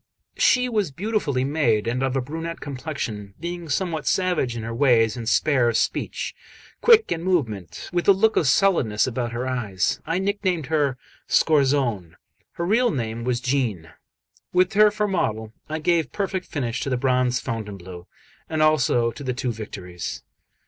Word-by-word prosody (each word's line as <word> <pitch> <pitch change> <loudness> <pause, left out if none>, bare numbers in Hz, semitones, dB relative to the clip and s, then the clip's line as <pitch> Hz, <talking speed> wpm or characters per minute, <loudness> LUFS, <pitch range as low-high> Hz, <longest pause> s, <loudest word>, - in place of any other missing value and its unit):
She 250 0 +4
was 215 -7 0
beautifully 165 - -1
made 130 -7 +1
and 125 +2 -1
of 135 0 0
a 135 - +1
brunette 165 +5 -5
complexion. 125 -8 -5
Being 170 0 -5
somewhat 160 0 -1
savage 175 -10 +1
in 115 - -5
her 115 +1 -4
ways 115 -4 +3
and 115 -2 -3
spare 130 -3 +3
of 115 - +1
speech, - - -2 0.5
quick 455 -1 +6
in 165 - -1
movement, 125 - -2
with 175 -1 0
a - - +9
look 220 +3 +3
of 155 - +2
sullenness 130 - +3
about 120 -1 -3
her 120 +2 -3
eyes, 105 -7 -1
I 165 - 0
nicknamed 190 -4 -1
her 145 -4 0 0.3
Scorzone; 130 - +2 0.4
her 170 - -3
real 235 +6 +3
name 115 -4 -3
was 125 0 0
Jeanne. 120 - -1 0.6
With 185 +3 +2
her 210 +1 +6
for 210 0 -1
model, 110 - -2 0.2
I 155 - -2
gave 160 -3 +1
perfect 190 -2 -3
finish 125 -3 -3
to - - -2
the 125 - 0
bronze 125 -1 +1
Fontainebleau, 95 -6 -6 0.4
and 155 -1 +1
also 130 -6 +3
to 145 - -10
the 130 -2 -1
two 125 -1 -2
Victories. 95 -5 -7
135 Hz, 165 wpm, -23 LUFS, 115-170 Hz, 0.6 s, a